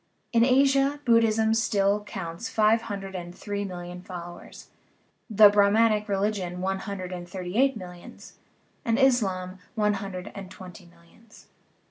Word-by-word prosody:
In 230 0 +5
Asia 275 +2 +3
Buddhism 225 -2 +3
still 205 -2 +1
counts 190 +1 -6
five 220 +1 +3
hundred 195 -3 -6
and 175 -1 -7
three 205 -1 -4
million 180 -2 -7
followers, 175 -1 -10 0.6
the 215 -1 +8
Brah 200 0 +4
manic 215 -1 +2
religion 195 -3 -1
one 190 +1 -1
hundred 190 -2 -6
and 175 -1 -7
thirty 180 0 -6
eight 265 0 +3
millions, 180 -3 -12 0.4
and 230 0 +1
Islam 195 -9 +1 0.2
one 210 -2 +2
hundred 195 -1 -6
and 195 -2 -8
twenty 180 -1 -12
millions. 170 +6 -21
200 Hz, 140 wpm, -26 LUFS, 180-225 Hz, 0.6 s, the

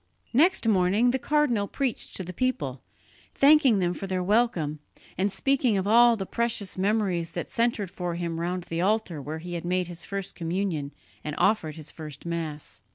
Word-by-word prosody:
Next 305 -1 +4
morning 205 +4 +3
the 265 - -1
cardinal 250 -8 +1
preached 265 0 -3
to 190 - -3
the 180 +1 -7
people, 155 - -2 0.5
thanking 275 -5 +6
them 175 -2 +1
for 195 - -6
their 185 -1 -1
welcome, 180 -8 +1 0.4
and 195 +3 0
speaking 255 -3 +2
of 190 - -1
all 235 +2 +6
the 195 - -3
precious 230 -3 -1
memories 190 -4 0
that 175 - -5
centred 230 -5 0
for 175 -1 -4
him 170 -1 -3
round 175 +1 -2
the 165 0 -3
altar 195 -5 0
where 150 +3 -5
he 175 +2 -7
had 170 - -4
made 180 +1 0
his 175 0 -8
first 195 -1 -4
communion 165 -4 -2 0.3
and 150 -1 -4
offered 195 -7 +1
his 155 -2 -8
first 150 -3 -9
Mass. 165 -3 -5
185 Hz, 180 wpm, -26 LUFS, 170-225 Hz, 0.5 s, thanking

